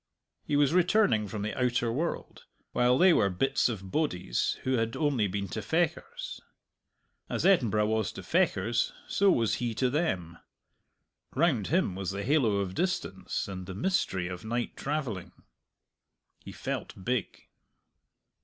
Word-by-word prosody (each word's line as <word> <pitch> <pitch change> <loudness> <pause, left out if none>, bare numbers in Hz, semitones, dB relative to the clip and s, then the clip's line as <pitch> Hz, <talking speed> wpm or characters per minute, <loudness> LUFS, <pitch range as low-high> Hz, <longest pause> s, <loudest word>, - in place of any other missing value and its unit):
He 145 - -1
was 145 +1 +3
returning 180 - +3
from 105 0 -4
the 110 - -2
outer 120 -2 +1
world, 155 +8 -3 0.3
while 125 +1 +3
they 185 +3 +6
were 100 - +3
bits 110 +8 +1
of 95 -5 -6
bodies 90 - 0
who 130 0 +1
had 115 0 -1
only 140 -9 +1
been 100 +1 -3
to - - -4
Fechars. 455 - -2 0.9
As - - -1
Edinburgh 115 - +4
was 110 0 0
to - - -8
Fechars 130 -10 +1
so 200 0 +3
was 115 - +2
he 120 -2 -1
to 125 +2 +1
them. 90 - -1 1.0
Round 135 - +2
him 175 - +1
was 95 -1 -4
the 100 +1 -3
halo 130 -6 +3
of 100 -2 -1
distance 95 - -2
and 95 -2 -6
the 95 - -6
mystery 95 - 0
of 90 0 -6
night 120 +2 -2
travelling. 135 - -3 1.1
He - - -8
felt 95 - -5
big. 125 -3 -2
120 Hz, 145 wpm, -29 LUFS, 100-155 Hz, 1.1 s, they